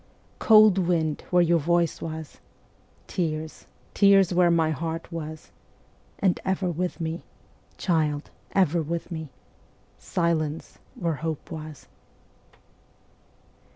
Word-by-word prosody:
Cold 215 Hz, -3 st, +6 dB
wind 165 Hz, -4 st, 0 dB
where 180 Hz, -1 st, +4 dB
your 170 Hz, 0 st, +3 dB
voice 170 Hz, +1 st, +1 dB
was, 160 Hz, -1 st, -7 dB, 0.7 s
Tears, 160 Hz, -3 st, -4 dB, 0.3 s
tears 195 Hz, -2 st, +5 dB
where 175 Hz, 0 st, +4 dB
my 165 Hz, -2 st, +2 dB
heart 165 Hz, +3 st, -4 dB
was, 155 Hz, -1 st, -7 dB, 0.7 s
And 185 Hz, -3 st, +1 dB
ever 190 Hz, -1 st, 0 dB
with 180 Hz, +2 st, -3 dB
me, 165 Hz, +1 st, -3 dB, 0.6 s
Child, 155 Hz, -4 st, 0 dB, 0.2 s
ever 175 Hz, -3 st, +3 dB
with 170 Hz, +3 st, -4 dB
me, 160 Hz, -3 st, -5 dB, 0.7 s
Silence 165 Hz, -3 st, -2 dB, 0.2 s
where 165 Hz, -4 st, -2 dB
hope 160 Hz, -2 st, -4 dB
was. 155 Hz, -2 st, -8 dB
165 Hz, 105 wpm, -25 LUFS, 155-180 Hz, 0.7 s, Cold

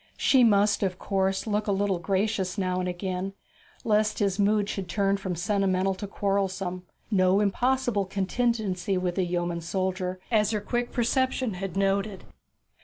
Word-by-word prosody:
She 265 Hz, -2 st, +4 dB
must, 205 Hz, -2 st, +4 dB
of 185 Hz, -2 st, -1 dB
course, 190 Hz, -1 st, 0 dB
look 210 Hz, -1 st, -1 dB
a -, -, +2 dB
little 195 Hz, -2 st, 0 dB
gracious 190 Hz, +1 st, -1 dB
again 185 Hz, 0 st, -2 dB
now, 195 Hz, 0 st, -5 dB, 0.5 s
lest 215 Hz, -1 st, +2 dB
his 200 Hz, -2 st, 0 dB
mood 205 Hz, 0 st, +3 dB
should 195 Hz, -4 st, -4 dB
turn 195 Hz, +2 st, +1 dB
from 190 Hz, -2 st, -4 dB
sentimental 195 Hz, +1 st, +1 dB
to 195 Hz, +2 st, -6 dB
quarrelsome 195 Hz, -2 st, -2 dB, 0.2 s
no 185 Hz, -1 st, +4 dB
impossible 240 Hz, 0 st, +1 dB
contingency 195 Hz, -1 st, -1 dB
with 180 Hz, -1 st, -1 dB
the 190 Hz, -, 0 dB
yeoman 175 Hz, -1 st, -2 dB
soldier, 185 Hz, +1 st, -2 dB
as 215 Hz, -3 st, +3 dB
her 215 Hz, -1 st, 0 dB
quick 240 Hz, +3 st, -2 dB
perception 255 Hz, -1 st, 0 dB
had 190 Hz, 0 st, -5 dB
noted. 195 Hz, 0 st, 0 dB
195 Hz, 150 wpm, -27 LUFS, 185-210 Hz, 0.5 s, She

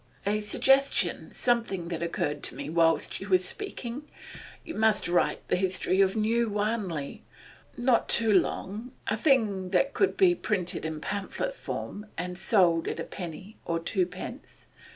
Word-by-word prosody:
'A 210 Hz, +1 st, +1 dB
suggestion 270 Hz, +6 st, +2 dB
something 225 Hz, -8 st, 0 dB
that 170 Hz, -2 st, -4 dB
occurred 150 Hz, -3 st, -2 dB
to -, -, -1 dB
me 140 Hz, +3 st, -6 dB
whilst 165 Hz, +1 st, +2 dB
you 200 Hz, -, -7 dB
were 185 Hz, -, +6 dB
speaking. 260 Hz, -, -4 dB, 0.6 s
You 325 Hz, -, -6 dB
must 220 Hz, -1 st, +2 dB
write 175 Hz, 0 st, 0 dB
the -, -, +2 dB
history 185 Hz, 0 st, +2 dB
of 195 Hz, +1 st, +3 dB
New 225 Hz, +2 st, +1 dB
Wanley 205 Hz, -8 st, -2 dB, 0.5 s
Not 245 Hz, -1 st, +2 dB
too 225 Hz, -2 st, +4 dB
long; 210 Hz, +5 st, -1 dB
a -, -, 0 dB
thing 220 Hz, -8 st, +2 dB
that 275 Hz, +9 st, +2 dB
could 390 Hz, -, +1 dB
be 370 Hz, -2 st, +5 dB
printed 185 Hz, -, -1 dB
in 160 Hz, -1 st, -4 dB
pamphlet 205 Hz, -, -3 dB
form 210 Hz, -, -6 dB
and 180 Hz, +1 st, -4 dB
sold 175 Hz, -4 st, +3 dB
at -, -, -3 dB
a -, -, -2 dB
penny 185 Hz, +3 st, -8 dB
or 170 Hz, -, -1 dB
twopence. 180 Hz, +1 st, -4 dB
200 Hz, 150 wpm, -28 LUFS, 175-230 Hz, 0.6 s, were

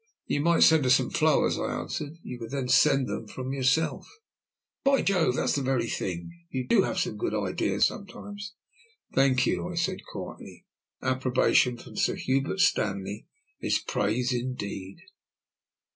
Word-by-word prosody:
"You 145 Hz, -, 0 dB
might 170 Hz, +2 st, +4 dB
send 160 Hz, -3 st, +6 dB
her 130 Hz, -, +1 dB
some 125 Hz, 0 st, +3 dB
flowers," 155 Hz, -2 st, +2 dB
I -, -, -1 dB
answered. 145 Hz, -, -5 dB
"You 125 Hz, -, -7 dB
could 115 Hz, -, -7 dB
then 135 Hz, -2 st, -3 dB
send 135 Hz, -2 st, +4 dB
them 110 Hz, -, -4 dB
from 130 Hz, +4 st, -5 dB
yourself." 135 Hz, +4 st, +1 dB, 0.8 s
"By 275 Hz, 0 st, +3 dB
Jove, 175 Hz, -10 st, +2 dB
that's -, -, +1 dB
the 140 Hz, -, 0 dB
very 130 Hz, -3 st, 0 dB
thing. 85 Hz, -6 st, -4 dB, 0.2 s
You 130 Hz, -1 st, -3 dB
do 225 Hz, -, +5 dB
have -, -, -2 dB
some -, -, -1 dB
good -, -, -2 dB
ideas -, -, +1 dB
sometimes." 205 Hz, 0 st, -6 dB, 0.6 s
"Thank 130 Hz, -1 st, +3 dB
you," 175 Hz, -, -1 dB
I 180 Hz, -, -6 dB
said 180 Hz, +3 st, -1 dB
quietly. -, -, -9 dB, 0.4 s
"Approbation 130 Hz, -1 st, +2 dB
from -, -, -12 dB
Sir -, -, +1 dB
Hubert 135 Hz, +8 st, 0 dB
Stanley 100 Hz, -, 0 dB, 0.3 s
is -, -, +1 dB
praise 120 Hz, +5 st, -1 dB
indeed." 100 Hz, -6 st, -4 dB
130 Hz, 155 wpm, -27 LUFS, 120-160 Hz, 0.8 s, send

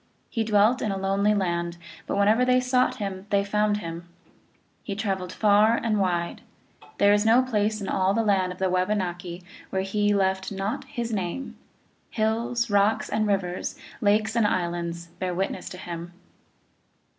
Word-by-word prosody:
He 225 Hz, -, 0 dB
dwelt 215 Hz, +4 st, +3 dB
in 215 Hz, -, 0 dB
a 195 Hz, -, -2 dB
lonely 195 Hz, +2 st, +1 dB
land, 170 Hz, -3 st, -1 dB, 0.3 s
but -, -, -1 dB
whenever 210 Hz, +4 st, +4 dB
they 250 Hz, 0 st, +4 dB
sought 250 Hz, 0 st, +2 dB
him 195 Hz, -1 st, -5 dB
they 200 Hz, -1 st, +2 dB
found 210 Hz, +1 st, +1 dB
him. 170 Hz, -3 st, -7 dB, 0.2 s
2 -, -, -33 dB, 0.5 s
He 200 Hz, -, -5 dB
traveled 195 Hz, -4 st, -2 dB
far 215 Hz, +2 st, +4 dB
and 220 Hz, -3 st, 0 dB
wide: 175 Hz, -3 st, -1 dB, 0.6 s
there 200 Hz, 0 st, +5 dB
is 205 Hz, 0 st, +3 dB
no 230 Hz, +3 st, +5 dB
place 215 Hz, -3 st, 0 dB
in 200 Hz, -, -5 dB
all 190 Hz, +1 st, +1 dB
the 230 Hz, -, +2 dB
land 190 Hz, -3 st, +2 dB
of 180 Hz, -, -8 dB
the 190 Hz, -, +1 dB
Wabanaki 180 Hz, -2 st, -1 dB, 0.3 s
where 190 Hz, 0 st, -1 dB
he 205 Hz, +1 st, +1 dB
left 190 Hz, 0 st, 0 dB
not 205 Hz, +8 st, -3 dB
his 240 Hz, -4 st, -4 dB
name; 195 Hz, +6 st, -3 dB, 0.5 s
hills, 235 Hz, +2 st, 0 dB
rocks 205 Hz, +2 st, +2 dB
and 215 Hz, 0 st, 0 dB
rivers, 185 Hz, -3 st, -2 dB, 0.2 s
lakes 215 Hz, +2 st, +2 dB
and 230 Hz, -3 st, +3 dB
islands, 170 Hz, -2 st, -2 dB
bear 180 Hz, -1 st, -2 dB
witness 190 Hz, +2 st, -3 dB
to 180 Hz, -, -8 dB
him. 175 Hz, -1 st, -7 dB
200 Hz, 170 wpm, -25 LUFS, 185-220 Hz, 0.6 s, there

